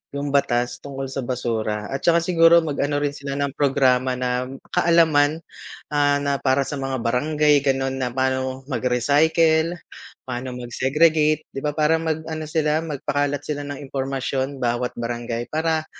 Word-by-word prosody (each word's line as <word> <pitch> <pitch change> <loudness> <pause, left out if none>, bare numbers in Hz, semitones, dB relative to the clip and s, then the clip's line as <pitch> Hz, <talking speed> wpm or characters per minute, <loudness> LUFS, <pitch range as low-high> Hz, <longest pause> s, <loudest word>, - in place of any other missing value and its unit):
yung 140 +1 -3
batas 120 -3 +1
tungkol 135 -1 -6
sa 135 +1 -4
basura 115 -4 -2
at 135 0 -3
saka 170 -1 +4
siguro 170 -1 +6
mag-ano 145 0 -1
rin 145 0 -1
sila 140 0 -5
ng 140 -1 -1
programa 130 -2 +2
na 125 0 -1
m 135 - -8 0.2
kaalaman, 160 -2 +3 0.5
ah, 145 -1 +3
na 140 0 0
para 135 +1 +2
sa 145 - -4
mga 135 -1 -2
barangay 150 +4 +2
ganun 135 -1 0
na 125 - 0
paano 130 +1 -1
mag-recycle, 160 +6 +2 0.5
paano 125 +1 -4
mag-segregate 150 +5 +2
'di 135 - -2
ba 150 - 0
para 155 +1 +3
mag-ano 160 0 -3
sila, 155 0 +1
mag-pakalat 145 -2 -1
sila 145 -1 -3
ng 145 -1 -5
impormasyon 135 0 -2
bawat 120 0 -1
barangay, 120 0 -3
para 160 0 0
140 Hz, 150 wpm, -22 LUFS, 130-150 Hz, 0.5 s, siguro